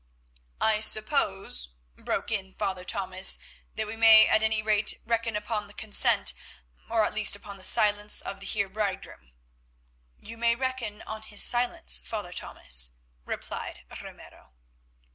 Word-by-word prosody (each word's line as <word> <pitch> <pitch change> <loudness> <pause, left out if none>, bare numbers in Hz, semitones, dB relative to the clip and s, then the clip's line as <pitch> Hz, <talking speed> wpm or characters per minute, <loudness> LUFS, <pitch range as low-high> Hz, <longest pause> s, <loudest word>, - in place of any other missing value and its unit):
"I 220 -1 +3
suppose," 215 - +2 0.3
broke - - -3
in 190 -3 -2
Father 190 -3 -4
Thomas, 185 0 +3 0.4
"that 220 - -3
we 210 +1 -7
may 225 -1 +7
at 215 - +2
any 220 -1 0
rate 215 -1 +1
reckon 230 -1 -2
upon 210 0 -4
the 205 - -15
consent, 220 -1 +2 0.6
or 225 -1 +2
at - - -3
least 210 -1 +3
upon 200 0 -11
the 190 - -8
silence 210 +1 +3
of 195 - -5
the 200 - -6
Heer 200 -1 -1
bridegroom." 190 - -6 0.9
"You 230 +1 -11
may 235 0 +2
reckon 255 -4 -5
on 220 0 -8
his 215 -1 +1
silence, 150 - +1
Father - - -6
Thomas," - - -1 0.3
replied - - -7 0.2
Ramiro. 65 - -15
210 Hz, 145 wpm, -26 LUFS, 195-220 Hz, 0.9 s, may